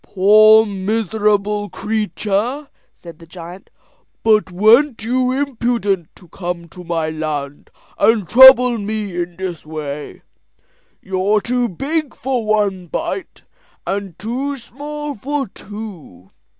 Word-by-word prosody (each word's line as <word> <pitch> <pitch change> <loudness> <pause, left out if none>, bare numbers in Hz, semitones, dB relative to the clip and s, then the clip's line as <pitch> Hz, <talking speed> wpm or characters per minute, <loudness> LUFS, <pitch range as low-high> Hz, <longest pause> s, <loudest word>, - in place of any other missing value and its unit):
"Poor 215 +3 +6
miserable 210 0 -1
creature!" 220 +5 -2 0.3
said 170 -2 -13
the 165 - -15
giant; 175 +2 -11 0.5
"but 215 -3 +3
weren't 225 +7 +3
you 255 +2 0
impudent 235 - -1
to 180 - -18
come 175 -1 -5
to 180 +2 -12
my 165 -2 -2
land 150 -2 -5 0.3
and 220 -5 +3
trouble 250 0 +8
me 210 -2 -4
in 175 0 -4
this 185 -3 -5
way? 150 -2 -7 0.8
You're 190 +2 +1
too 245 +3 -1
big 290 - -3
for 255 -2 -2
one 205 -4 0
bite, 340 - -5 0.4
and 195 -3 -4
too 260 +8 -3
small 295 +4 -7
for 275 +3 -3
two. 190 - -11
210 Hz, 115 wpm, -18 LUFS, 180-245 Hz, 0.8 s, trouble